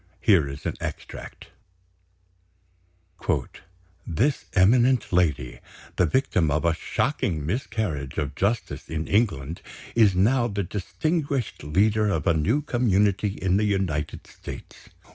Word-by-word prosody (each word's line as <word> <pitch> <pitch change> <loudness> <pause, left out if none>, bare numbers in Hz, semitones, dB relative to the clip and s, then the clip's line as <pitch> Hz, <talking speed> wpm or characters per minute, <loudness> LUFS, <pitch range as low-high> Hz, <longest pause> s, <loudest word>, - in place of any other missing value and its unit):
Here 85 -9 +4
is 70 +1 -8
an - - -1
extract: - - -7 2.6
"This 120 - 0
eminent 120 +5 +4
lady, 80 -9 +1 0.4
the 90 - +3
victim 90 - +1
of 75 +3 0
a 85 - +4
shocking 80 -2 -1
miscarriage 80 - -3
of 75 -3 -2
justice 100 +9 -2
in 80 0 -3
England, 85 - 0 0.3
is 105 -5 +4
now 120 +6 +3
the 100 -3 -2
distinguished 140 - -2
leader 105 +8 +2
of 80 -7 -1
a 85 - +4
new 105 - +1
community 105 -6 +2
in 95 -1 0
the 105 - +2
United 90 -7 -1
States. - - -11
95 Hz, 120 wpm, -25 LUFS, 80-115 Hz, 2.6 s, Here